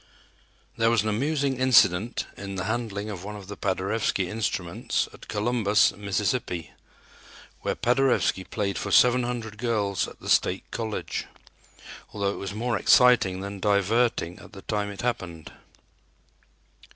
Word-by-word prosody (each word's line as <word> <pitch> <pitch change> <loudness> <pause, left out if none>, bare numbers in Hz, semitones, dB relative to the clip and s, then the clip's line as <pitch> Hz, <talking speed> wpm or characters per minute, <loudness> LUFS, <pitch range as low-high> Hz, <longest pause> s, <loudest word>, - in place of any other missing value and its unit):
There 115 0 +3
was 115 -3 +3
an 110 - -1
amusing 140 +4 0
incident 115 -4 +4
in 100 0 -7
the 90 - -3
handling 110 -2 -3
of 95 -3 -7
one 105 +1 -6
of 100 -2 -9
the 105 - -7
Paderewski 95 0 -1
instruments 100 -5 -2
at - - -14
Columbus, 105 -1 +2
Mississippi, 100 -2 -2 0.9
where - - -1
Paderewski 125 -6 +2
played 100 -3 -2
for - - -4
seven 125 0 +5
hundred 115 -3 -4
girls 105 -5 0
at - - -13
the - - -10
State - - +2
College, 110 -2 -4 0.9
although 100 -1 -1
it - - -7
was 100 -1 -4
more 115 +2 -1
exciting 110 -7 +5
than 100 0 -6
diverting 100 -1 +1
at - - -14
the 95 - -11
time 105 -1 -2
it 100 - -7
happened. 90 -10 -3
105 Hz, 140 wpm, -26 LUFS, 100-120 Hz, 0.9 s, seven